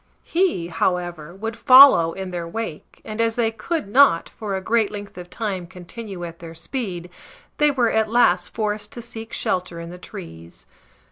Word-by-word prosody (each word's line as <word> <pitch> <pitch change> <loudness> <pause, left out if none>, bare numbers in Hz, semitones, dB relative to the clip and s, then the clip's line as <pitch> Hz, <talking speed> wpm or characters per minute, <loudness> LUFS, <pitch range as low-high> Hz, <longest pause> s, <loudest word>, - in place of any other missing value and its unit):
He, 335 - 0
however, 175 -2 -2
would 225 +3 -5
follow 255 -10 +8
in 190 -1 -6
their 170 -1 -4
wake, 195 -4 -7
and 215 +1 -3
as 225 -1 +1
they 230 -2 +1
could 315 +3 -3
not, 230 -6 +4
for 210 -3 -5
a - - -1
great 220 +2 +1
length 205 -1 -8
of 175 0 -9
time, 195 -6 -4
continue 185 +1 -8
at 165 -1 -9
their 165 -1 -10
speed, 180 -2 -4 0.5
they 295 0 +5
were 245 -5 +2
at 220 0 +2
last 185 -7 +3
forced 210 -1 -3
to 240 - -7
seek 225 -1 -9
shelter 180 -6 -2
in 170 0 -7
the 180 - -10
trees. 85 - -11
200 Hz, 180 wpm, -22 LUFS, 175-230 Hz, 0.5 s, follow